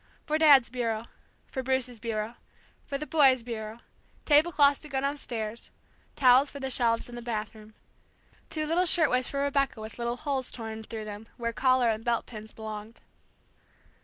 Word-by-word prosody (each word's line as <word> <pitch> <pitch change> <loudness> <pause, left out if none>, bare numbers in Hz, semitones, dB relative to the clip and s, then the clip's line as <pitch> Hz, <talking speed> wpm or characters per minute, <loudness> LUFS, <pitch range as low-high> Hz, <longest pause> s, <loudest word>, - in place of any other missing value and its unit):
For 310 +1 0
Dad's 280 -7 +6
bureau 230 -3 -2 0.4
for 260 - -5
Bruce's 255 -2 -1
bureau 220 0 -3 0.5
for 280 - -2
the 305 - -5
boys' 270 -6 +4
bureau, 225 -1 -6 0.4
table 305 +3 +4
cloths 285 -2 +4
to 300 - -12
go 270 -1 -1
downstairs, 235 -6 -4 0.5
towels 260 +1 +5
for 280 - -9
the 265 -1 -3
shelves 230 -3 +2
in 245 - -11
the 240 - -7
bathroom. 215 -2 -6 0.7
Two 310 -1 -2
little 345 +4 +2
shirtwaists 295 -7 +4
for 280 0 -1
Rebecca 275 -4 0
with 220 +2 -9
little 235 +1 -2
holes 270 -3 -2
torn 220 -2 -6
through 220 0 -7
them 210 +1 -8
where 235 -1 -3
collar 255 0 +3
and 220 0 -4
belt 235 -1 0
pins 220 -2 -10
belonged. 215 0 -8
245 Hz, 165 wpm, -28 LUFS, 225-280 Hz, 0.7 s, Dad's